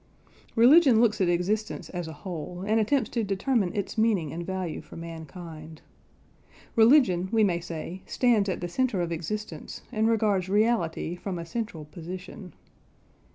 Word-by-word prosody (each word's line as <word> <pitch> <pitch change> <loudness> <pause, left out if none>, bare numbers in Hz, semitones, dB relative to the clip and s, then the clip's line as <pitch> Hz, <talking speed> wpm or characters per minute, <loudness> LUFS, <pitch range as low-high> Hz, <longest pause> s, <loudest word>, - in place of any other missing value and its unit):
Religion 255 +1 +7
looks 215 -3 +3
at 180 - +3
existence 195 +5 -1
as 175 -2 -4
a - - -6
whole, 175 0 -5
and 220 +2 +2
attempts 225 +2 +2
to 230 - 0
determine 200 0 0
its 205 +1 -3
meaning 200 -9 +1
and 170 +1 -4
value 185 -4 -3
for - - -13
mankind. 160 -1 -9 0.9
Religion, 220 -7 +5
we 225 -1 +4
may 175 -4 +2
say, 170 +2 -6
stands 225 -6 +2
at 185 - -3
the 175 - -2
centre 220 0 0
of 170 -1 -2
existence, 195 +6 -5
and 220 -1 +1
regards 205 -5 +1
reality 205 -6 +1
from 180 0 -5
a 170 - -5
central 170 -4 -5
position. 180 +4 -9
190 Hz, 155 wpm, -27 LUFS, 170-220 Hz, 0.9 s, Religion